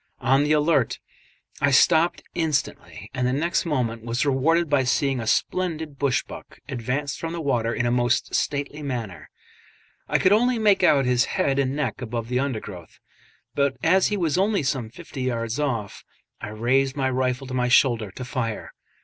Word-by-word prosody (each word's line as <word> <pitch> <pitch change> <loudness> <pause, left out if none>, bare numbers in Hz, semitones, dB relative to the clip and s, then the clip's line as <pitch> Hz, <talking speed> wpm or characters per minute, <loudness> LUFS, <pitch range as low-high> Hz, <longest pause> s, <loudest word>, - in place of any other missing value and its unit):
On 135 +2 +2
the 150 - 0
alert, 150 -4 +2 0.6
I 145 - +4
stopped 160 +5 +3
instantly, 160 -5 -3
and 125 -1 0
the - - +1
next 170 +5 0
moment 120 -7 -1
was 120 +3 -1
rewarded 160 +5 +2
by 145 -2 +2
seeing 135 +1 +1
a 115 - -5
splendid 160 -2 -1
bush 140 -3 +1
buck - - -12
advance 135 +2 -3
from 165 0 -5
the 170 - -4
water 120 -7 0
in 120 - -1
a 120 - +1
most 120 0 +1
stately 145 +1 -2
manner. 120 -10 -5 0.8
I - - +2
could 185 - +3
only 245 +3 +3
make 210 -3 +3
out 140 -2 +4
his 125 +1 +2
head 140 -7 +1
and 135 0 0
neck 135 -5 -2
above 115 -1 -4
the 125 0 0
undergrowth, 105 -10 -5 0.6
but 140 -2 0
as 185 +3 +4
he 210 - -1
was 170 -2 0
only 200 -3 +1
some 130 -5 -2
fifty 145 +1 -9
yards 115 -1 -2
off, 120 -9 -3 0.4
I 115 - -5
raised 130 +5 +1
my 135 -2 0
rifle 130 0 -1
to 130 - -7
my 125 -1 +1
shoulder 120 -4 +3
to 125 +7 -8
fire. 120 -4 -4
135 Hz, 180 wpm, -24 LUFS, 120-150 Hz, 0.8 s, I